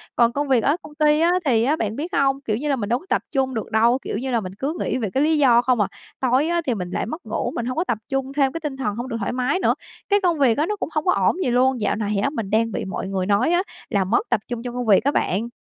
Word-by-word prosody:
Còn 235 0 +4
công 290 +2 -1
việc 255 -4 +3
ở 285 - +3
công 300 0 -13
ty 300 0 +3
á 335 +2 +4
thì 230 -5 +3
á 285 +6 +2
bạn 220 -7 -2
biết 320 +7 -4
hông? 275 0 +2
Kiểu 215 -6 -1
như 295 +5 -3
là, 280 - +2
mình 210 -5 -4
đúng 245 +6 0
tập - - +2
trung 265 -2 0
được 220 -3 -4
đâu, 230 +3 +4
kiểu - - -4
như 260 +2 -3
là, 235 - +2
mình 185 -1 -7
cứ 285 +4 -1
nghĩ - - -1
về 225 -5 -2
cái 270 - +2
lý 315 0 +3
do 245 -4 +5
không 245 -3 +2
à. 200 - +2 0.3
Tối 260 +3 +2
á 340 0 +1
thì 250 - +1
mình 180 -4 -4
lại - - -2
mất 315 +9 -7
ngủ, - - -2
mình 235 - -2
hông 255 +3 -3
có 335 - +2
tập 240 -11 -1
trung, 270 -1 -2
thêm 275 -2 +2
cái 330 - -4
tinh 285 -3 -4
thần 255 -7 -2
hông 240 +3 -4
được 230 -3 -3
thoải 200 - -2
mái 255 +7 0
nữa, - - +3 0.4
cái 405 0 +3
công 345 -5 +1
việc 250 -5 +3
á 300 - +2
nó 420 - -2
cũng 400 - -4
hông 305 +2 0
có 360 - +4
ổn - - +2
gì - - 0
luôn, 255 -1 +2
dạo 205 - +1
này 210 -1 -2
á 280 - +2
mình 225 -9 -4
đang 225 +1 +1
bị - - -3
mọi 195 0 -4
người 190 -1 -2
nói 205 - +2
á 350 +1 +2 0.3
là 200 -4 +1
mất 230 +5 0
tập - - +2
trung 240 -1 -5
trong 245 -1 -5
công 245 -1 -2
việc 205 -3 +5
á 285 - +2
bạn. 210 -1 0
255 Hz, 325 wpm, -22 LUFS, 225-290 Hz, 0.4 s, do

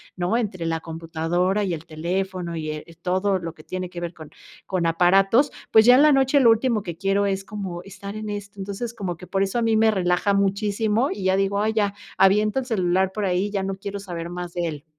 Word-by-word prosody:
¿no?, 180 +6 0
entre 195 -7 -3
la 165 0 -1
computadora, 165 +4 -1
y 185 -3 -1
el 160 -1 -6
teléfono 175 +2 -3
y, 155 -1 -4
eh, 155 0 -7 0.2
todo 190 +2 +1
lo 165 -2 -6
que 155 - -15
tiene 185 +1 -5
que 175 -1 -7
ver 175 0 -4
con 155 -3 -12 0.4
con 185 -3 -1
aparatos, 195 - +4 0.2
pues, 220 -1 +7
ya 245 +1 +8
en 265 - +6
la 305 - +6
noche 270 +1 +4
lo 240 -4 +6
último 225 -2 +1
que 170 -3 -6
quiero 195 +2 +1
es 195 -1 -1
como 195 -4 -6
estar 200 +1 -9
en 215 0 -5
esto, 205 -1 -7
entonces, 200 +4 -5
como 185 -6 -4
que 180 - -11
por 195 +2 -1
eso 195 +4 -2
a - - 0
mí 225 -1 +2
me 220 0 +5
relaja 185 0 +1
muchísimo, 210 +5 +1
y 195 - -5
ya 190 0 +3
digo: 195 +1 +1
"Ay 220 +1 +1
ya, 205 -2 +1 0.2
aviento 210 +5 +4
el 260 - -4
celular 190 -5 +1
por 210 0 -2
ahí, 185 +2 0
ya 200 -2 -1
no 195 0 -2
quiero 200 +1 -6
saber 170 -4 -6
más 175 0 -6
de 175 -1 -1
él". 150 -3 -6
195 Hz, 235 wpm, -23 LUFS, 175-210 Hz, 0.4 s, ya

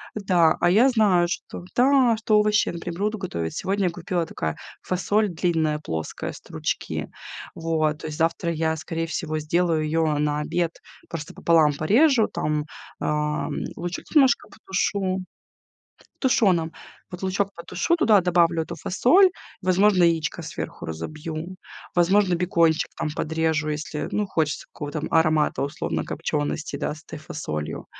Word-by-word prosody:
да. 180 -6 +3
А, 175 - +3
я 230 +9 +5
знаю, 200 -7 +3
что 175 - -5
да, 255 -2 +5
что 215 -1 +3
овощи, 210 0 +3
например, 170 +1 -6
буду 215 +1 0
готовить. 85 - -4
Сегодня 195 -1 0
купила, 170 0 -2
такая 80 - -3 0.3
фасоль 205 +3 +1
длинная 160 -3 0
плоская, 80 - -4
стручки, - - -4 0.5
вот, 160 -2 0
то - - -6
есть 150 - -6
завтра 165 +1 0
я, 160 0 0
скорее 165 +1 -3
всего, 155 0 -3
сделаю 160 +1 +1
её 155 -1 +1
на 150 0 0
обед, 170 +2 -2 0.3
просто 155 -3 -6
пополам 160 -3 +3
порежу, 225 - +4
там, 150 -1 -2 0.3
а, 150 0 -1 0.3
лучок 175 +1 -5
немножко 275 -3 +4
потушу 190 -1 -1 1.0
тушеным, 185 - +2 0.4
вот, 180 +1 -8
лучок 195 +1 0
потушу, 180 - -1
туда 215 - +5
добавлю 170 -2 +2
эту 170 - -6
фасоль, 345 - +4 0.3
возможно, 185 +1 +4
яичко 165 -2 +1
сверху 85 - -6
разобью, 155 - -6 0.4
возможно, 180 +1 +3
бекончик 170 -2 +2
там 155 - -2
подрежу, 160 -1 0
если, 150 0 -3
ну, 210 -1 0
хочется 155 -5 -1
какого-то 145 +1 -5
там 160 - -4
аромата, 155 -3 +3
условно, 140 - -2
копчёности, 150 -1 -3
да, 150 - -2
с 155 - -14
этой 155 - -8
фасолью. 80 - -5
170 Hz, 140 wpm, -24 LUFS, 155-190 Hz, 1.0 s, я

